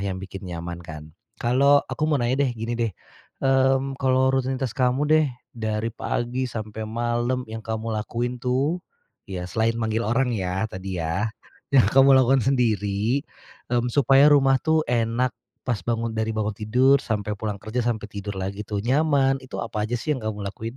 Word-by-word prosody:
yang 100 -1 -2
bikin 95 0 -8
nyaman, 85 0 -6
kan. 75 -2 -10 0.2
Kalau, 140 +4 +4
aku 155 - -2
mau 150 - +3
nanya 130 +2 +1
deh, - - -1
gini 115 +1 -3
deh, 115 -3 -1 0.5
eee, 135 0 +4 0.2
kalau 130 0 +3
rutinitas 130 -2 -1
kamu 125 +2 +1
deh, 155 -1 +5 0.3
dari 110 0 -2
pagi 125 +3 -2
sampai 110 -1 -6
malam 120 +2 -1
yang 110 0 -7
kamu 110 0 -4
lakuin 120 +3 -3
tuh, 135 +8 0 0.5
ya 90 -2 -4
selain 115 +5 0
manggil 110 0 -1
orang 125 +2 +1
ya, 95 -2 -1
tadi 95 0 -5
ya, 85 +7 -1 0.5
yang 130 - +7
kamu 135 +1 +6
lakukan 130 +1 +4
sendiri, 115 0 +1 0.5
e - - 0 0.2
supaya 135 +2 +5
rumah 135 -2 +5
tuh 160 0 +2
enak 120 +1 +1 0.3
pas 120 -6 0
bangun 115 -1 -1
dari 110 0 -1
bangun 110 0 0
tidur 125 +7 +3
sampai 105 -2 -2
pulang 105 -1 -3
kerja, 110 +5 -3
sampai 110 -3 -1
tidur 100 0 -5
lagi 95 +2 -4
tuh 105 -1 -2
nyaman, 135 0 +3
itu 130 - -8
apa 110 -2 -3
aja 120 - -2
sih 150 +6 -1
yang 130 - -5
kamu 105 -2 -4
lakuin? 115 +4 -6
115 Hz, 175 wpm, -24 LUFS, 105-130 Hz, 0.5 s, yang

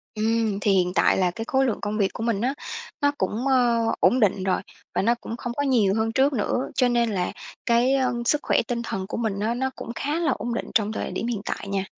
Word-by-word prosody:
Ừm. 220 -1 +1
Thì 205 - +2
hiện 180 -2 +2
tại - - +4
là 185 -2 +2
cái 225 +6 -6
khối 265 +3 +2
lượng 235 - -1
công 210 +1 -2
việc 195 -2 +1
của 225 - -6
mình 230 -4 0
á, 255 +4 0 0.5
nó 285 0 +4
cũng, 215 +7 -1
ờ, 245 -3 +3 0.2
ổn 255 - +4
định 190 -2 +2
rồi 190 - +1 0.3
và - - +1
nó 235 +4 +3
cũng 230 -1 -7
không 240 0 -4
có 285 - +1
nhiều 225 -8 +3
hơn 225 0 0
trước 275 +3 +3
nữa. 245 +2 -1
Cho 250 - +3
nên 235 -2 +2
là 180 -3 -1 0.3
cái 240 +3 +3 0.3
sức 295 +4 +2
khỏe - - +2
tinh 235 -2 -1
thần 190 -3 -3
của - - -5
mình 220 -4 -1
á 220 +3 0
nó 265 +2 -1
cũng 235 - -6
khá 295 +3 -2
là 335 -2 +1
ổn 240 0 -3
định - - -4
trong 215 -1 +2
thời - - -3
điểm - - -3
hiện 235 -4 -2
tại - - -4
nha. 195 -1 -1
230 Hz, 255 wpm, -24 LUFS, 205-245 Hz, 0.5 s, tại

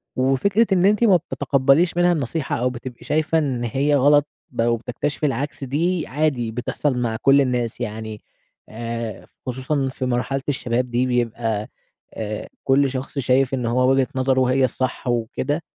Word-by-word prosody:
وفكرة 160 - +2
إن 180 0 +3
أنتِ 210 +3 +3
ما 200 -5 +6
بتتقبليش 140 +1 +2
منها 175 0 +4
النصيحة 150 -1 -1
أو 125 +1 +1
بتبقي 125 0 -8
شايفة 155 +1 +1
إن 130 -6 -1
هي 140 +5 +1
غلط 145 +2 +4 0.2
بقى 120 -1 +1
وبتكتشفي 125 +6 -3
العكس، 140 +1 -2
دي 165 +6 0
عادي 130 -6 0
بتحصل 125 +3 -2
مع 115 -2 -1
كل 140 +1 +5
الناس 125 -3 -1
يعني 110 -1 -5 0.5
آآ، 115 -2 -5 0.2
خصوصًا 130 +2 -1
في 130 0 -4
مرحلة 125 +2 -1
الشباب 125 -2 -1
دي 125 +2 +1
بيبقى، 115 -3 -1 0.5
آآ، 105 -1 -5 0.2
كل 135 0 +3
شخص 135 +2 -4
شايف 130 +1 +2
إن 125 -2 -1
هو 125 +2 +2
وجهة 135 -1 +3
نظره 130 0 +2
هي 130 0 +3
الصح 130 +1 -3
وكده، 120 +6 -1
130 Hz, 155 wpm, -22 LUFS, 120-145 Hz, 0.5 s, ما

